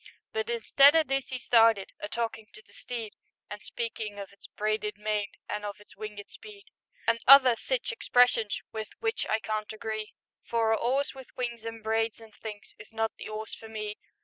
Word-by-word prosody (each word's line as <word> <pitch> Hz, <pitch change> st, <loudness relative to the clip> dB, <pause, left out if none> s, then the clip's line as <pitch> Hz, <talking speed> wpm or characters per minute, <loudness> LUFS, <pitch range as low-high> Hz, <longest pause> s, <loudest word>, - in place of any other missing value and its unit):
But 220 Hz, 0 st, -2 dB
instead 275 Hz, +5 st, +6 dB
o' 320 Hz, -, +6 dB
this 270 Hz, -2 st, -2 dB
'e 255 Hz, -, -2 dB
started 225 Hz, -5 st, +4 dB
A 205 Hz, -, -5 dB
talkin' 225 Hz, -2 st, -3 dB
to 215 Hz, -, -14 dB
the -, -, -22 dB
steed, 230 Hz, -4 st, -6 dB, 0.4 s
And 210 Hz, 0 st, -6 dB
speakin' 220 Hz, -3 st, -5 dB
of 200 Hz, -1 st, -8 dB
its 200 Hz, -, -14 dB
"braided 215 Hz, -1 st, -2 dB
mane" 210 Hz, -1 st, -2 dB
An' 210 Hz, 0 st, -3 dB
of 205 Hz, -1 st, -5 dB
its 210 Hz, -, -18 dB
"winged 210 Hz, -1 st, -7 dB
speed," 420 Hz, -1 st, -13 dB, 0.4 s
And 230 Hz, 0 st, +2 dB
other 260 Hz, -2 st, +10 dB
sich -, -, -2 dB
expressions 245 Hz, -, +3 dB
With 220 Hz, -1 st, -5 dB
which 450 Hz, 0 st, -1 dB
I 220 Hz, -, +2 dB
can't 215 Hz, -1 st, -3 dB
agree, 215 Hz, 0 st, -5 dB, 0.3 s
For 225 Hz, -1 st, +1 dB
a -, -, +5 dB
'orse 265 Hz, +5 st, 0 dB
with 265 Hz, -1 st, -11 dB
wings 235 Hz, -2 st, -3 dB
an' 225 Hz, -1 st, -7 dB
braids 225 Hz, +1 st, 0 dB
an' 225 Hz, -1 st, -14 dB
things 210 Hz, -1 st, -9 dB
Is 215 Hz, -, -12 dB
not 225 Hz, 0 st, -1 dB
the -, -, -7 dB
'orse 215 Hz, 0 st, -5 dB
for 225 Hz, -, -9 dB
me. 215 Hz, -1 st, -5 dB
225 Hz, 195 wpm, -29 LUFS, 215-240 Hz, 0.4 s, other